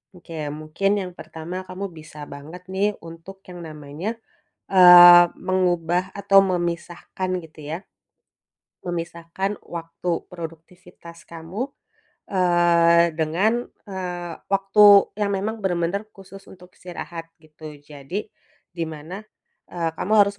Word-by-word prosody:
Oke, 170 Hz, -1 st, -13 dB, 0.2 s
mungkin 155 Hz, +6 st, -2 dB
yang 185 Hz, -2 st, -4 dB
pertama, 175 Hz, +2 st, -7 dB
kamu 185 Hz, +1 st, -7 dB
bisa 155 Hz, -1 st, -10 dB
banget 160 Hz, +6 st, -11 dB
nih, 195 Hz, +3 st, -1 dB
untuk 165 Hz, +4 st, -12 dB
yang 180 Hz, -1 st, -10 dB
namanya, 155 Hz, +7 st, -6 dB, 0.5 s
eee, 175 Hz, -1 st, +10 dB, 0.2 s
mengubah 180 Hz, 0 st, 0 dB
atau 195 Hz, -1 st, +4 dB
memisahkan 175 Hz, 0 st, -3 dB
gitu 160 Hz, -2 st, -14 dB
ya. 165 Hz, -, -3 dB, 1.1 s
Memisahkan 170 Hz, +3 st, -4 dB
waktu 170 Hz, +1 st, -6 dB, 0.2 s
produktivitas 170 Hz, 0 st, -11 dB
kamu, 175 Hz, +11 st, -6 dB, 0.6 s
eee, 170 Hz, -2 st, +4 dB
dengan, 195 Hz, +10 st, +1 dB, 0.2 s
eee, 180 Hz, -2 st, -5 dB
waktu 195 Hz, +1 st, +3 dB, 0.3 s
yang 200 Hz, -1 st, 0 dB
memang 215 Hz, +4 st, -3 dB
benar-benar 190 Hz, +1 st, -1 dB
khusus 195 Hz, 0 st, -14 dB
untuk 180 Hz, -1 st, -15 dB
istirahat, 175 Hz, -2 st, -8 dB, 0.2 s
gitu. 155 Hz, -1 st, -12 dB
Jadi, 145 Hz, +8 st, -7 dB, 0.4 s
di 170 Hz, -2 st, -4 dB
mana, 160 Hz, +4 st, -8 dB, 0.6 s
eee, 165 Hz, -2 st, -1 dB
kamu 210 Hz, -, -2 dB
harus 200 Hz, 0 st, -2 dB
175 Hz, 110 wpm, -23 LUFS, 165-190 Hz, 1.1 s, eee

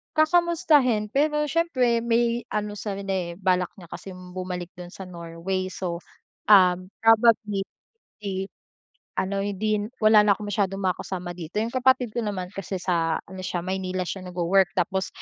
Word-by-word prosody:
Kakamustahin, 310 Hz, -9 st, +3 dB
pero 300 Hz, +2 st, +2 dB
siyempre 275 Hz, -7 st, +1 dB
may 235 Hz, 0 st, +1 dB
ano 210 Hz, 0 st, -2 dB
seven 200 Hz, -2 st, -4 dB
day. 185 Hz, -3 st, -2 dB
Balak 185 Hz, -1 st, +1 dB
niya 175 Hz, -5 st, -14 dB
kasing 185 Hz, -1 st, -9 dB
bumalik 180 Hz, -1 st, -5 dB
do'n 175 Hz, -, -7 dB
sa 190 Hz, +2 st, -9 dB
Norway. 175 Hz, +1 st, -4 dB
So, 180 Hz, -2 st, -4 dB, 0.5 s
um, 185 Hz, -3 st, +6 dB, 0.2 s
probably, 220 Hz, -3 st, +4 dB, 0.6 s
eh, 195 Hz, -1 st, -3 dB, 0.7 s
ano 195 Hz, +1 st, -1 dB
hindi 205 Hz, +1 st, 0 dB
n 210 Hz, -, -4 dB, 0.2 s
wala 215 Hz, 0 st, +8 dB
na 205 Hz, -2 st, +4 dB
akong 205 Hz, -1 st, -6 dB
masyadong 195 Hz, -1 st, -1 dB
makakasama 180 Hz, -1 st, -2 dB
dito. 175 Hz, +2 st, -9 dB
Yung 230 Hz, -, -5 dB
kapatid 255 Hz, -3 st, +3 dB
ko 240 Hz, -, -1 dB
naman 195 Hz, -4 st, -4 dB
kasi 195 Hz, -1 st, -4 dB
sa 170 Hz, -3 st, 0 dB
ano 190 Hz, 0 st, -9 dB
siya 180 Hz, -2 st, -3 dB
Maynila 185 Hz, 0 st, -2 dB
siya 185 Hz, +2 st, -5 dB
nagwo-work. 180 Hz, +1 st, +2 dB
Tapos 190 Hz, +1 st, 0 dB
195 Hz, 155 wpm, -25 LUFS, 180-220 Hz, 0.7 s, wala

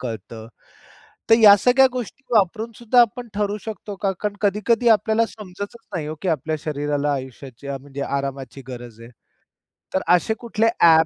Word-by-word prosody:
कळतं. 110 Hz, -1 st, -7 dB, 0.8 s
तर -, -, +10 dB
या 205 Hz, -2 st, +9 dB
सगळ्या 265 Hz, +2 st, +6 dB
गोष्टी 250 Hz, +1 st, -6 dB
वापरून 215 Hz, +3 st, +2 dB
सुद्धा 240 Hz, +1 st, +4 dB
आपण 240 Hz, +1 st, +1 dB
ठरवू 205 Hz, 0 st, -1 dB
शकतो 210 Hz, -2 st, -7 dB
का? 195 Hz, 0 st, -1 dB
कारण 205 Hz, -1 st, -2 dB
कधी-कधी 215 Hz, +4 st, +2 dB
आपल्याला 220 Hz, +1 st, +3 dB
समजतच 205 Hz, +1 st, -8 dB, 0.2 s
नाही 155 Hz, -4 st, -3 dB
हो, 155 Hz, -, -4 dB
की 190 Hz, -, -1 dB
आपल्या 155 Hz, 0 st, -1 dB
शरीराला 145 Hz, -1 st, -1 dB
आयुष्याची 130 Hz, 0 st, -7 dB
म्हणजे 140 Hz, 0 st, -6 dB
आरामाची 135 Hz, -1 st, -4 dB
गरज 120 Hz, -3 st, -9 dB
आहे. 115 Hz, +1 st, -12 dB, 0.8 s
तर 190 Hz, -, +1 dB
असे 200 Hz, +5 st, 0 dB
कुठले 230 Hz, -1 st, 0 dB
ॲप 160 Hz, -1 st, +6 dB
185 Hz, 155 wpm, -22 LUFS, 140-220 Hz, 0.8 s, तर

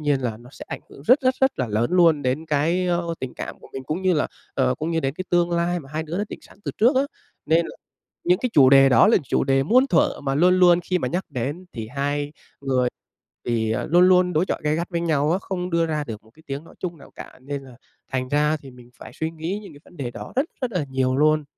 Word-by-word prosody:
nhiên 145 Hz, -3 st, +1 dB
là 115 Hz, -4 st, -2 dB
nó 120 Hz, +2 st, -15 dB
sẽ -, -, -10 dB
ảnh -, -, -5 dB
hưởng 140 Hz, -, -13 dB
rất, 260 Hz, +4 st, +6 dB
rất, 255 Hz, 0 st, +2 dB
rất 265 Hz, 0 st, +2 dB
là 130 Hz, -, 0 dB
lớn 110 Hz, +6 st, 0 dB
luôn 165 Hz, -5 st, +4 dB
đến 135 Hz, +6 st, -1 dB
cái, 165 Hz, +5 st, +1 dB
ơ, 170 Hz, -1 st, -1 dB
tình 130 Hz, -1 st, -5 dB
cảm -, -, -7 dB
của -, -, -14 dB
mình 135 Hz, -1 st, -6 dB
cũng 160 Hz, +7 st, -3 dB
như 185 Hz, -1 st, +3 dB
là, 150 Hz, -, +1 dB, 0.3 s
ờ, 130 Hz, -2 st, +2 dB
cũng 160 Hz, +2 st, -4 dB
như 165 Hz, -, 0 dB
đến 135 Hz, -1 st, -2 dB
cái 185 Hz, -, -5 dB
tương 175 Hz, 0 st, +2 dB
lai 170 Hz, 0 st, 0 dB
mà 135 Hz, -, -14 dB
hai 155 Hz, +1 st, -2 dB
đứa 165 Hz, +4 st, -4 dB
đã 205 Hz, -, 0 dB
định -, -, -8 dB
sẵn -, -, -18 dB
từ -, -, -2 dB
trước 245 Hz, +5 st, +4 dB
á. 270 Hz, -, +4 dB, 0.4 s
Nên 165 Hz, +2 st, +3 dB
là -, -, -10 dB, 0.5 s
những 180 Hz, +1 st, +3 dB
cái 250 Hz, -, -1 dB
chủ 135 Hz, -3 st, +7 dB
đề 135 Hz, 0 st, +7 dB
đó 130 Hz, -, +6 dB
là 230 Hz, -, +5 dB
chủ -, -, 0 dB
đề 135 Hz, 0 st, +2 dB
muôn 255 Hz, -, +4 dB
thuở 170 Hz, -9 st, +2 dB
mà 135 Hz, 0 st, -1 dB
luôn 180 Hz, +4 st, +4 dB
luôn 175 Hz, -1 st, +6 dB
khi 180 Hz, 0 st, 0 dB
mà -, -, -1 dB
nhắc 180 Hz, +3 st, -2 dB
đến 145 Hz, +7 st, -4 dB
thì 110 Hz, -2 st, -6 dB
hai 145 Hz, +1 st, -1 dB, 0.3 s
người 130 Hz, -2 st, +1 dB, 0.6 s
thì, 110 Hz, -2 st, 0 dB
ờ, 110 Hz, -, -2 dB
luôn 175 Hz, +3 st, +5 dB
luôn 180 Hz, -1 st, +4 dB
đối 160 Hz, +4 st, +2 dB
chọi -, -, -3 dB
gay 150 Hz, 0 st, +1 dB
gắt 170 Hz, +3 st, -3 dB
với 170 Hz, -1 st, -2 dB
nhau 155 Hz, -2 st, +1 dB
á, 180 Hz, -, +2 dB
không 180 Hz, -1 st, -4 dB
đưa 170 Hz, -1 st, +2 dB
ra 155 Hz, -2 st, -2 dB
được 110 Hz, -4 st, -8 dB
một 110 Hz, -, -22 dB
cái 160 Hz, -, -21 dB
tiếng 140 Hz, +3 st, -5 dB
nói -, -, -17 dB
chung 175 Hz, -3 st, -4 dB
nào -, -, -16 dB
cả, -, -, -11 dB
nên 140 Hz, 0 st, -5 dB
là 130 Hz, -2 st, -14 dB, 0.4 s
thành 130 Hz, -1 st, -1 dB
ra 150 Hz, +1 st, +2 dB
thì 135 Hz, -3 st, -13 dB
mình 125 Hz, -1 st, -16 dB
phải -, -, -10 dB
suy 160 Hz, 0 st, -3 dB
nghĩ 165 Hz, +5 st, -4 dB
những 195 Hz, -, -11 dB
cái 145 Hz, -, -14 dB
vấn 180 Hz, -, -18 dB
đề 125 Hz, -4 st, -4 dB
đó -, -, -9 dB
rất, 270 Hz, +4 st, +2 dB, 0.2 s
rất 250 Hz, -2 st, -1 dB
là 175 Hz, -7 st, -1 dB
nhiều 130 Hz, -1 st, 0 dB
luôn. 155 Hz, 0 st, +3 dB
155 Hz, 280 wpm, -23 LUFS, 135-175 Hz, 0.6 s, chủ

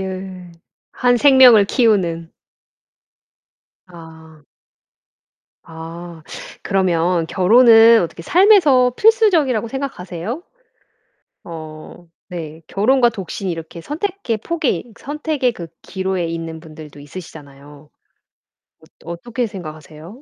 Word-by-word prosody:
예. 185 Hz, -1 st, -7 dB, 0.4 s
한 245 Hz, 0 st, +2 dB
생명을 255 Hz, -5 st, +6 dB
키우는. 180 Hz, -9 st, 0 dB, 1.5 s
아. 160 Hz, -3 st, -15 dB, 1.2 s
아 165 Hz, 0 st, -10 dB, 0.4 s
그러면 180 Hz, -3 st, 0 dB
결혼은 225 Hz, +3 st, +6 dB
어떻게 170 Hz, 0 st, -6 dB
삶에서 330 Hz, -, +4 dB
필수적이라고 345 Hz, -, +2 dB
생각하세요? 225 Hz, -, -6 dB, 1.0 s
어 160 Hz, 0 st, -11 dB, 0.2 s
네. 165 Hz, -3 st, -8 dB
결혼과 240 Hz, +5 st, +2 dB
독신이 195 Hz, -3 st, -5 dB
이렇게 165 Hz, 0 st, -7 dB
선택의 315 Hz, -, -4 dB
폭이 275 Hz, -2 st, -3 dB
선택의 295 Hz, -3 st, -2 dB
그 170 Hz, -6 st, -9 dB, 0.2 s
기로에 190 Hz, -2 st, -3 dB
있는 165 Hz, -1 st, -6 dB
분들도 155 Hz, -2 st, -13 dB
있으시잖아요. 145 Hz, -2 st, -13 dB, 1.2 s
어 170 Hz, -, -6 dB
어떻게 235 Hz, +8 st, -4 dB
생각하세요? 160 Hz, -, -11 dB
185 Hz, 225 characters per minute, -18 LUFS, 165-245 Hz, 1.5 s, 생명을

